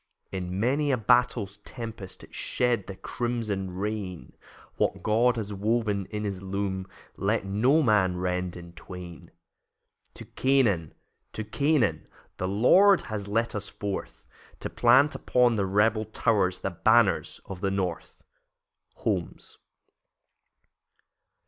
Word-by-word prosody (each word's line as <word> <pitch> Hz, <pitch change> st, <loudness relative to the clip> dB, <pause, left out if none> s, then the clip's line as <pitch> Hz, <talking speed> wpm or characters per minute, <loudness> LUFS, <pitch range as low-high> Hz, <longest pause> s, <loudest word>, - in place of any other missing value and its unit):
In 95 Hz, 0 st, -4 dB
many 140 Hz, +6 st, +1 dB
a 130 Hz, -, +2 dB
battle's 115 Hz, -3 st, +2 dB
tempest 110 Hz, -3 st, -8 dB
It -, -, -15 dB
shed 120 Hz, -5 st, 0 dB
the 95 Hz, -, -6 dB
crimson 110 Hz, -5 st, -3 dB
rain 95 Hz, -1 st, -5 dB, 0.4 s
What -, -, 0 dB
God 120 Hz, +3 st, +3 dB
has 105 Hz, -3 st, -4 dB
woven 105 Hz, -1 st, 0 dB
in 105 Hz, -1 st, -4 dB
his 100 Hz, -3 st, -3 dB
loom 95 Hz, -1 st, -3 dB, 0.3 s
Let 100 Hz, +1 st, 0 dB
no 125 Hz, +11 st, +3 dB
man 100 Hz, -7 st, +3 dB
rend 90 Hz, 0 st, -2 dB
in 85 Hz, 0 st, -11 dB
twain. 85 Hz, 0 st, -10 dB, 0.9 s
To -, -, -9 dB
Canaan, 115 Hz, -, +1 dB, 0.4 s
to 110 Hz, -, -4 dB
Canaan, 140 Hz, +2 st, +1 dB, 0.3 s
The 95 Hz, -, -2 dB
Lord 180 Hz, -, +5 dB
has 100 Hz, -2 st, -4 dB
led 115 Hz, +3 st, 0 dB
us 100 Hz, -1 st, -5 dB
forth, 100 Hz, -2 st, -5 dB, 0.4 s
To -, -, -4 dB
plant 130 Hz, +5 st, +5 dB
upon 125 Hz, -2 st, +2 dB
the 100 Hz, -2 st, 0 dB
rebel 105 Hz, +3 st, +2 dB
towers 100 Hz, -4 st, +1 dB
The 95 Hz, -, -2 dB
banners 110 Hz, +3 st, +2 dB
of 95 Hz, -2 st, -8 dB
the 100 Hz, -, +1 dB
North. 95 Hz, -3 st, -4 dB, 0.7 s
Holmes. -, -, -4 dB
105 Hz, 125 wpm, -27 LUFS, 95-120 Hz, 0.9 s, Lord